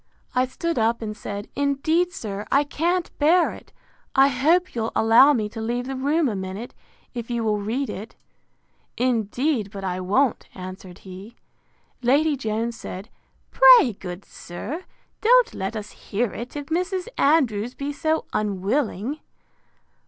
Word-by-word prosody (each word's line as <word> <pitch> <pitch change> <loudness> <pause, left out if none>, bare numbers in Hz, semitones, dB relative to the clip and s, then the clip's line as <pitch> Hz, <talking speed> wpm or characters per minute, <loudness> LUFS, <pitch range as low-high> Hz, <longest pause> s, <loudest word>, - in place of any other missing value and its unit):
I 255 +1 +2
stood 335 +3 -2
up, 230 +1 +1
and 215 -1 -4
said, 205 -1 -6
Indeed, 300 +5 +1
sir, 205 - -6
I 280 - +4
can't 340 +5 -1
bear 335 +4 +4
it; - - -14 0.4
I 270 +1 +6
hope 325 +8 +2
you'll 225 -1 -2
allow 230 +6 +6
me 220 -7 0
to 225 +1 -7
leave 240 +2 -2
the 270 +1 -4
room 290 +4 +1
a 220 - -2
minute, 190 +5 -6 0.4
if 235 -2 -6
you 235 -1 -1
will 210 -1 +1
read 235 +7 -2
it. 215 +4 -7 0.8
Indeed 240 0 0
but 195 -1 -8
I 185 -1 -2
won't, 220 +8 +1
answered 185 -1 -9
he. 190 +5 -10 0.7
Lady 285 +5 +3
Jones 230 -1 -2
said, 195 +5 -7 0.4
Pray, - - +7
good 185 -1 -8
sir, 265 - -7 0.4
don't - - +5
let 190 +4 -4
us 210 -1 -6
hear 220 +1 -3
it, 240 +5 -7
if 290 -1 -4
Mrs. 365 +5 -2
Andrews 250 -6 +2
be 285 +1 -4
so 315 +2 0
unwilling. 210 - -1
245 Hz, 150 wpm, -23 LUFS, 210-290 Hz, 0.8 s, Pray